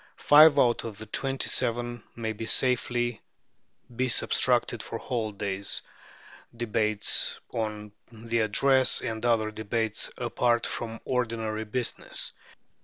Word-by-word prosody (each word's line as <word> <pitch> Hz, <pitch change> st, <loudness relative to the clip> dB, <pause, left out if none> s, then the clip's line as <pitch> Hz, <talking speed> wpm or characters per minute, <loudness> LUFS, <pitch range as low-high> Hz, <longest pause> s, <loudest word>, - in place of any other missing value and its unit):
Five 150 Hz, 0 st, +7 dB
out 120 Hz, -2 st, +3 dB
of 110 Hz, -3 st, -7 dB
the 110 Hz, -, -8 dB
twenty 135 Hz, +5 st, -2 dB
seven 120 Hz, 0 st, 0 dB
may 110 Hz, -2 st, -3 dB
safely 120 Hz, -2 st, +1 dB, 0.7 s
be 130 Hz, +2 st, 0 dB
subtracted -, -, +2 dB
for -, -, -5 dB
holidays, 100 Hz, -5 st, -3 dB, 0.7 s
debates 110 Hz, -2 st, 0 dB
on 105 Hz, -2 st, -4 dB, 0.2 s
the 115 Hz, +1 st, -3 dB
Address, 130 Hz, +5 st, +3 dB
and 110 Hz, 0 st, -4 dB
other 115 Hz, -3 st, +2 dB
debates 110 Hz, 0 st, -2 dB
apart 120 Hz, 0 st, +1 dB
from 115 Hz, -1 st, -4 dB
ordinary 115 Hz, -3 st, -2 dB
business. 120 Hz, +3 st, -2 dB
115 Hz, 110 wpm, -27 LUFS, 110-120 Hz, 0.7 s, Five